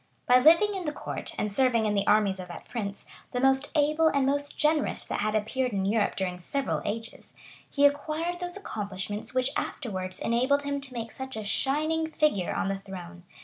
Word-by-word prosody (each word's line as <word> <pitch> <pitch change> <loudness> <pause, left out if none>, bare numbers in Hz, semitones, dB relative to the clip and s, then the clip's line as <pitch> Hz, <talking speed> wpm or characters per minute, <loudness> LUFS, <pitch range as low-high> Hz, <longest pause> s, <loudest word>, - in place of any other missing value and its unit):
By 250 0 +6
living 335 +9 +6
in 375 -3 -4
the 300 - 0
court, - - -6
and 210 -1 -1
serving 235 -1 +3
in 210 - +1
the 200 -1 0
armies 205 -3 +3
of 180 - -6
that 175 - -10
prince, 205 -4 -5 0.3
the 250 - 0
most 270 +2 +3
able 305 +2 +3
and 280 -3 +2
most 285 +1 0
generous 300 -1 +1
that - - -3
had 215 +1 0
appeared 245 +3 0
in 195 -1 0
Europe 210 +1 +1
during 180 -2 -2
several 275 +10 -2
ages, 225 +2 -6 0.3
he 285 - +3
acquired 310 +4 +1
those 355 +1 -5
accomplishments 205 - -5
which 255 +1 +2
afterwards 185 -5 -4
enabled 260 +5 +2
him 280 0 -2
to 270 -2 -9
make 230 -2 -5
such 265 -2 -7
a 215 - -5
shining 310 +8 0
figure 300 - +1
on - - -1
the 195 0 -2
throne. 180 -2 -9
250 Hz, 195 wpm, -28 LUFS, 205-285 Hz, 0.3 s, By